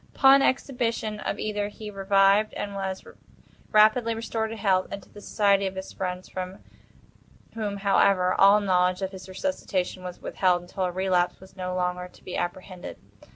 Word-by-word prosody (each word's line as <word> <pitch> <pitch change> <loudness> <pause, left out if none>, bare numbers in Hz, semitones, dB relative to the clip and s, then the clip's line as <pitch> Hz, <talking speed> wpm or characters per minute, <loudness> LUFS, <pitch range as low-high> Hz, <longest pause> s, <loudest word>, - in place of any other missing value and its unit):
Upon 275 0 +7
exhibition 235 -5 -1
of 205 - -3
ether 210 -1 -2
he 210 0 -9
revived 195 +1 +3
and 200 - -4
was 190 -1 -4 0.7
rapidly 220 +2 +4
restored 225 0 -3
to 225 - -5
health, 190 -3 +2
and 200 -1 -7
to - - -20
the 205 - -13
society 200 -2 +2
of 190 - -6
his 190 0 -7
friends—from 185 0 -5 1.0
whom, 210 -3 -3
however, 195 -2 +3
all 200 +2 +6
knowledge 185 -1 +2
of 190 - -2
his 190 -1 -10
resuscitation 185 -4 -2
was 180 -1 -7
withheld, 180 -2 +1
until 185 +1 -3
a 180 - -1
relapse 180 -1 0
was 190 0 -16
no 185 -1 -4
longer 180 0 -2
to - - -21
be 180 - -6
apprehended. 180 +1 -5
195 Hz, 165 wpm, -26 LUFS, 185-210 Hz, 1.0 s, Upon